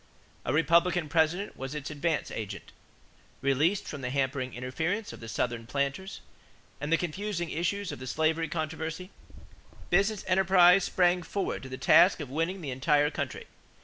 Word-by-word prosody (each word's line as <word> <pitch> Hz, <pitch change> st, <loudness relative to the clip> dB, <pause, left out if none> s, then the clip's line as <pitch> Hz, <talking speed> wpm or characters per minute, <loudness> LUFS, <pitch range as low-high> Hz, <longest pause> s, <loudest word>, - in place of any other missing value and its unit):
A -, -, 0 dB
Republican 170 Hz, +2 st, +3 dB
President 165 Hz, +5 st, +1 dB
was 135 Hz, +2 st, -6 dB
its 150 Hz, 0 st, -5 dB
"advance 150 Hz, +1 st, -1 dB
agent." 105 Hz, -2 st, -6 dB, 0.7 s
Released 145 Hz, +8 st, +1 dB
from 145 Hz, -, -6 dB
the 125 Hz, -, -3 dB
hampering 130 Hz, -1 st, -1 dB
interference 160 Hz, -, -3 dB
of -, -, -10 dB
the 115 Hz, -, -8 dB
Southern 115 Hz, 0 st, -2 dB
planters 140 Hz, -, -3 dB, 0.6 s
and 145 Hz, -, -4 dB
the 165 Hz, -, +5 dB
confusing 175 Hz, +1 st, -3 dB
issues 185 Hz, +4 st, -2 dB
of -, -, -7 dB
the 130 Hz, -, -7 dB
slavery 160 Hz, +4 st, +1 dB
controversy, 160 Hz, +3 st, -4 dB, 0.8 s
business 200 Hz, +3 st, +2 dB
enterprise 185 Hz, 0 st, +5 dB
sprang 180 Hz, 0 st, +2 dB
forward 190 Hz, +3 st, -3 dB
to 130 Hz, -, -9 dB
the 130 Hz, -, -6 dB
task 180 Hz, +7 st, +5 dB
of 145 Hz, -4 st, -6 dB
winning 165 Hz, +6 st, -1 dB
the 145 Hz, -5 st, -4 dB
entire 145 Hz, +3 st, +2 dB
country. -, -, -4 dB
160 Hz, 155 wpm, -29 LUFS, 140-180 Hz, 0.8 s, the